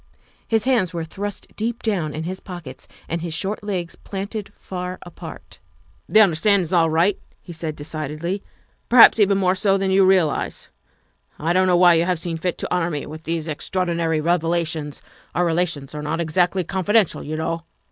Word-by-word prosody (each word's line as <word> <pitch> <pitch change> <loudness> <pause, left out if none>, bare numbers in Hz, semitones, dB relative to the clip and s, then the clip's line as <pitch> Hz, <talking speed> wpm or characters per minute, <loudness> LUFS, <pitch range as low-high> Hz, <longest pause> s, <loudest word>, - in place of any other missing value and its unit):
His 225 -2 +2
hands 225 -10 +1
were 165 - -2
thrust 200 +5 -7
deep 230 +2 -3
down 185 -9 0
in 160 - -3
his 185 +3 -5
pockets 175 -9 -9 0.2
and 170 +1 -3
his 165 -2 -2
short 200 +5 -2
legs 185 -5 -3
planted 200 +1 -6
far 180 0 -6
apart. 175 - -11 0.2
" - - -35
The 215 - +7
understanding's 185 -1 +3
all 165 -2 +4
right," 170 +5 +2 0.2
he 175 - -10
said 160 -2 -4
decidedly, 155 +5 -4 0.2
' - - -37
' - - -43
perhaps 235 -1 +8
even 200 -1 +4
more 185 -2 +3
so 195 +1 +2
than 195 -1 0
you 195 +1 +5
realize. 185 -5 +1 0.7
I 165 +3 0
don 185 +1 +4
't - - +1
know 180 -1 +4
why 175 -1 +7
you 165 0 +3
have 180 -1 +1
seen 165 0 -3
fit 180 +1 -2
to - - -3
honor 175 -1 +1
me 150 -4 -4
with 155 +2 -9
these 165 -1 -2
extraor 180 +4 -2
dinary 165 -2 0
revelations 165 -3 -1 0.3
our 175 - +2
relations 165 -5 -1
are 150 - -5
not 155 +3 -2
exactly 175 +3 +1
confi 190 +4 -2
dential, 215 -7 +3
you 155 +2 -4
know. 165 +1 -2
175 Hz, 200 wpm, -22 LUFS, 160-190 Hz, 0.7 s, perhaps